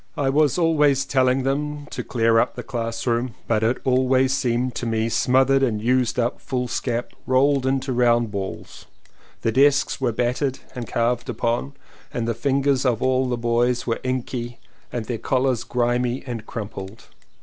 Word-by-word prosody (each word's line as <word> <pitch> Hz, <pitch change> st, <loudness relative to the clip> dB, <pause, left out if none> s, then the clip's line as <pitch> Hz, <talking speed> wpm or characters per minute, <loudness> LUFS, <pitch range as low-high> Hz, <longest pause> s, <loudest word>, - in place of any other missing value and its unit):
I 135 Hz, -2 st, +1 dB
was 150 Hz, +1 st, +3 dB
always 150 Hz, -5 st, +3 dB
telling 130 Hz, 0 st, +2 dB
them 145 Hz, +2 st, -2 dB
to -, -, -4 dB
clear 115 Hz, -1 st, +2 dB
up -, -, 0 dB
the -, -, -6 dB
classroom 115 Hz, 0 st, -2 dB
but 110 Hz, -2 st, +1 dB
it 115 Hz, +3 st, +1 dB
always 130 Hz, 0 st, +3 dB
seemed 125 Hz, -1 st, 0 dB
to 120 Hz, -, -4 dB
me 115 Hz, 0 st, 0 dB
smothered 130 Hz, +3 st, +3 dB
in 115 Hz, -6 st, +1 dB
used 125 Hz, +1 st, +1 dB
up 120 Hz, 0 st, -1 dB
fools 125 Hz, -2 st, -2 dB
cap 120 Hz, -1 st, -3 dB, 0.2 s
rolled 130 Hz, +1 st, +3 dB
into 135 Hz, 0 st, 0 dB
round 120 Hz, -2 st, +2 dB
balls; 100 Hz, -2 st, -6 dB, 0.6 s
the 115 Hz, -, +2 dB
desks 135 Hz, +3 st, +3 dB
were 125 Hz, -3 st, +1 dB
battered 125 Hz, +4 st, -1 dB, 0.2 s
and 120 Hz, -3 st, -6 dB
carved 120 Hz, +1 st, 0 dB
upon 120 Hz, +4 st, -1 dB, 0.4 s
and 115 Hz, -1 st, -2 dB
the 115 Hz, -, +1 dB
fingers 135 Hz, +2 st, +1 dB
of 120 Hz, -4 st, +1 dB
all 130 Hz, 0 st, +2 dB
the 120 Hz, -, -1 dB
boys 120 Hz, +1 st, +1 dB
were 115 Hz, -, -2 dB
inky 125 Hz, -2 st, -3 dB, 0.3 s
and 120 Hz, -2 st, -3 dB
their 115 Hz, -1 st, -4 dB
collars 130 Hz, -2 st, 0 dB
grimy 120 Hz, +1 st, 0 dB
and 115 Hz, -4 st, -6 dB
crumpled. 100 Hz, -1 st, -7 dB
125 Hz, 165 wpm, -23 LUFS, 115-135 Hz, 0.6 s, was